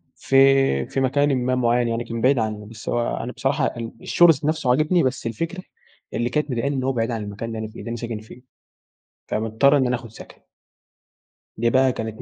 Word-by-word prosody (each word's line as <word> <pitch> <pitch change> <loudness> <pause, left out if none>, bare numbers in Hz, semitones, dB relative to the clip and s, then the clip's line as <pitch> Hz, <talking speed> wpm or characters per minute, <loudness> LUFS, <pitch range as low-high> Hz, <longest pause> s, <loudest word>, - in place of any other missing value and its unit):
في 135 - +3
في - - -3
مكانٍ 140 +1 +2
ما 130 0 +1
معين 120 -1 +2
يعني، 115 0 -1
كان 115 -1 -5
بعيد 130 +1 +3
عني 110 -2 -3
بس 110 +1 -9
هو 120 0 -1
أنا 120 - -4
بصراحة 135 +2 0
ال 115 -2 -4
الشغل 175 -1 +5
ذات 145 0 -7
نفسه 155 -4 0
عاجبني 155 +7 +3
بس 130 -2 -1
الفكرة 165 +11 -4 0.5
اللي 120 +1 -1
كانت 150 +1 -1
مضايقاني، 135 +3 -1
إن 130 - -2
هو 135 - +1
بعيد 115 -2 -1
عن 115 -2 -3
المكان 105 +3 -6
اللي 115 -1 -5
أنا 110 - -4
فيه 110 - -12
اللي - - -7
أنا 120 - -4
ساكن 115 -2 -5
فيه، 110 +3 -14 0.9
فمضطر 110 +6 +2
إن 130 -2 +2
أنا 125 - +1
أخد 120 -1 -8
سكن. - - -13 1.2
دي 120 - +2
بقى 130 +1 +3
كانت 110 -2 -6
120 Hz, 210 wpm, -22 LUFS, 115-135 Hz, 1.2 s, الشغل